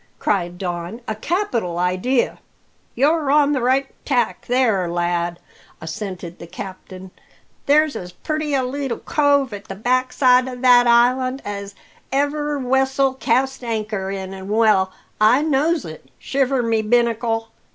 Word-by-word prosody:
cried 175 -3 -1
Don. 175 +3 -4
"A 220 - -1
capital 230 - -2
idea!" 185 +8 0 0.6
"You're 295 +3 +2
on 290 0 +4
the 270 -3 0
right 260 +3 +2 0.2
tack 250 -4 -1
there, 225 -8 +2
lad," 175 0 -1 0.4
assented 175 +1 -6
the 170 - -9
captain. 185 +1 -9 0.6
"There's 300 +1 +4
as 180 -1 -6
purty 305 - -3
a 265 - +1
leetle 265 -1 -3
cove 285 -4 +1
at 200 -1 -8
the 195 - -7
backside 255 +3 +2
o' 255 - -5
that 245 -1 +5
island 255 +3 +3
as 200 -1 -6 0.4
ever 290 +2 0
wessel 265 +1 +1
cast 265 +1 0
anchor 215 -4 -3
in, 190 -1 -5
an' 190 0 -8
well 210 -4 +3 0.3
I 230 +7 +5
knows 310 +2 +1
it, 155 -4 -10
shiver 270 -2 0
my 225 -1 +1
binnacle! 230 0 +1
240 Hz, 140 wpm, -21 LUFS, 195-270 Hz, 0.6 s, that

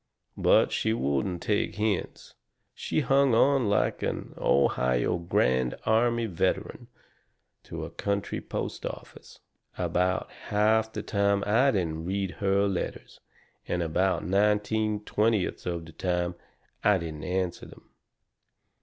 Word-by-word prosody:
But - - +4
she 110 - 0
wouldn't 85 - -1
take 105 -1 0
the - - -14
hints. 105 -2 -2 0.4
She - - -1
hung 135 -2 +3
on 135 -2 +3
like 100 - +1
an - - -3
Ohio 65 +2 +1
Grand 65 -7 +1
Army 115 +1 +2
veteran 95 +5 -2 0.8
to - - -6
a - - -9
country 100 0 -2
post - - -5
office. - - -9 0.4
About 90 +1 0 0.2
half 110 +1 +2
the - - -5
time 100 -1 +1
I 120 +7 +4
didn't 80 -8 -1
read 95 0 -2
her 100 0 +2
letters, 95 -3 -4 0.5
and 90 -1 -1
about 90 +3 0
nineteen 105 +2 +1
twentieths 105 -3 0
of 85 -2 -3
the 80 - -12
time 90 +1 -1 0.5
I 105 -1 +5
didn't 80 -3 -6
answer 90 -1 -2
them. - - -17
100 Hz, 125 wpm, -27 LUFS, 85-110 Hz, 0.8 s, I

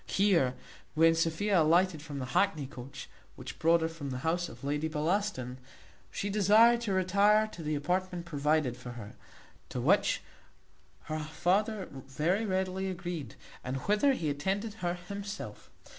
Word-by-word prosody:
Here, 170 -11 +3 0.4
when 165 +1 +6
Sophia 165 +4 +2
alighted 170 +1 +3
from 145 -2 -7
the 130 - -3
hackney 175 -8 +2
coach, 135 -1 -9 0.3
which - - -9
brought 165 +1 +4
her 160 - +1
from 160 -4 -7
the 130 - -3
house 175 +1 0
of 120 +2 -13
Lady 150 +2 -1
Bellaston, 155 -5 -1 0.5
she 200 - -3
desired 215 +4 +5
to 225 -4 -2
retire 200 +3 +4
to 175 - -10
the 155 -1 -1
apartment 180 +4 -1
provided 150 -4 +1
for 125 -1 -9
her; 110 -3 -9 0.6
to - - -4
which - - +2 0.8
her 155 0 -4
father 190 +6 0
very 150 +10 -1
readily 190 0 -1
agreed, 175 -5 -5 0.3
and 130 +1 -3
whither 210 - +3
he 160 - -1
attended 195 +9 -2
her 175 -1 0
himself. 195 - -7
170 Hz, 150 wpm, -30 LUFS, 150-195 Hz, 0.8 s, when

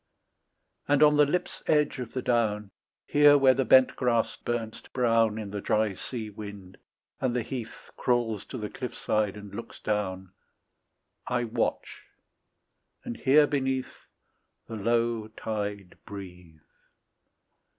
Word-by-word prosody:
And 145 +1 +4
on 150 0 +6
the 145 -1 +6
lip's 180 +4 -2
edge 150 -3 +2
of 125 -3 -6
the 130 - -3
down, 105 -4 0 0.3
Here 145 0 +6
where 135 -2 +6
the 135 - +1
bent 130 0 +6
grass 120 -3 +1
burns 115 -2 -4
to - - -19
brown 115 -3 +2
In 105 -3 -5
the 105 0 -4
dry 110 -1 +1
sea 110 +2 -6
wind, 100 -2 -9 0.4
and 125 -2 0
the 125 - 0
heath 120 -3 -7
Crawls 120 -4 0
to 130 - -7
the 105 -3 -4
cliff 125 +2 -6
side 105 -1 0
and 100 -1 -10
looks 115 +2 -8
down, 95 -3 -2 1.0
I 125 -1 0
watch, 115 - -3 1.0
and 120 - -5
hear 145 +5 +5
beneath 135 -3 -2 0.6
The 115 - -6
low 115 +1 0
tide 105 -3 -5
breathe. 90 -5 -10
115 Hz, 140 wpm, -28 LUFS, 105-130 Hz, 1.0 s, on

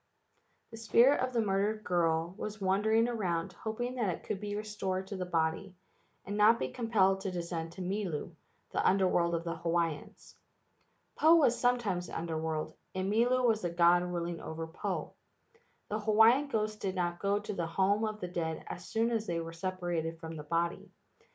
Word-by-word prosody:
The 225 - -9
spirit 235 +4 +4
of 255 0 0
the 235 -2 +1
murdered 205 +2 0
girl 170 -2 +1
was 215 0 -6
wandering 210 +4 +2
around 185 -6 -2
hoping 225 +6 -4
that 220 -5 +1
it 175 - -4
could 195 - -3
be 205 0 -4
restored 200 -3 -3
to 200 - -6
the 185 -1 -4
body, 170 +3 -1 0.5
and 205 - -4
not 215 +2 +6
be - - -2
compelled 200 -5 +2
to 195 - -2
descend 170 -2 -4
to 185 +1 -6
Milu, 180 -4 -3 0.4
the - - 0
Under 190 0 +4
world 170 -1 +2
of 165 - -2
the 170 -1 -4
Hawaiians. 165 -2 -2 0.9
Po 320 +2 +7
was 275 -8 +4
some¬ 245 0 +3
times 185 -7 -2
the - - -5
Under 165 -1 -3
world, 160 -1 -3 0.2
and 190 +1 -1
Milu 245 +3 +3
was 220 -2 +3
the 175 - -1
god 170 +1 +4
ruling 175 -1 -3
over 160 +1 -5
Po. 160 +1 -4 0.8
The 215 - -1
Hawaiian 225 +6 +5
ghosts 215 -4 -1
did 195 -2 -3
not 175 -1 -1
go 200 0 +1
to 210 0 -4
the 170 -3 -2
home 195 +5 +1
of 215 -1 -2
the 180 - -3
dead 165 -2 -3
as 175 - -8
soon 230 +1 +1
as 225 -2 -1
they 170 -1 -1
were 165 0 -6
separated 175 -2 -3
from 165 -1 -7
the 155 - -6
body. 170 +2 -1
190 Hz, 190 wpm, -31 LUFS, 170-215 Hz, 0.9 s, Po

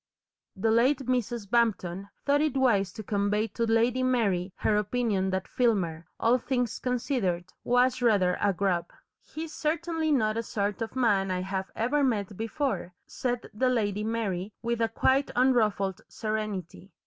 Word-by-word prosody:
The 220 +3 +1
late 255 +4 +3
Mrs. 240 -3 -1
Bampton 200 -4 0 0.2
thought 285 +1 +3
it 300 -3 +1
wise 205 -8 +3
to 215 - -7
convey 205 +1 0
to 230 +3 -1
Lady 230 +3 +2
Mary 205 -8 +1
her 215 - +1
opinion 210 -2 0
that 190 0 -2
Filmer, 175 -10 0
all 240 +3 +3
things 245 -2 -1
considered, 230 -8 -1
was 250 +1 +2
rather 200 -7 +3
a 205 - +3
"grub." 180 -2 0 0.3
"He's 315 0 -8
certainly 320 0 -1
not 220 -6 +2
a - - +1
sort 205 -3 -2
of 225 +2 -4
man 205 -7 +2
I 180 0 -1
have 190 0 -3
ever 280 +6 +1
met 210 -6 0
before," 225 - -2
said 245 -1 -3
the 255 +5 +1
Lady 210 -4 0
Mary, 215 -4 -2
with 235 0 -1
a 225 - +2
quite 265 +4 +2
unruffled 215 -7 +2
serenity. 210 -4 -4
225 Hz, 155 wpm, -28 LUFS, 195-250 Hz, 0.3 s, late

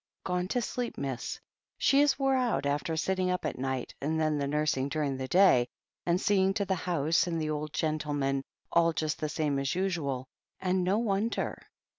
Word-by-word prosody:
'Gone 180 0 -1
to 245 +4 0
sleep, 245 +2 -3
miss. 135 -3 -4 0.4
She 280 +1 +4
is 290 -1 +3
wore 270 -1 +2
out, 250 - +1
after 150 +4 -1
sitting 185 +2 0
up 180 0 -1
at - - -3
night, 130 -1 -2
and 160 +3 0
then 155 -2 +1
the 140 - 0
nursing 145 -2 0
during 145 -2 -1
the 130 0 -4
day, 175 -8 +5 0.4
and 175 +1 +3
seeing 195 -2 +2
to 200 - 0
the 190 - +1
house 170 -2 +1
and 165 -2 -1
the 155 -1 -1
old 150 0 -3
gentleman, 145 -4 -1 0.3
all 170 0 +4
just 155 -1 -1
the 155 - -2
same 150 -3 0
as 135 +2 -1
usual 155 -9 -1 0.2
— - - -21
^and 185 0 +2
no 185 +3 +2
wonder." 220 0 -1
160 Hz, 195 wpm, -30 LUFS, 145-190 Hz, 0.4 s, day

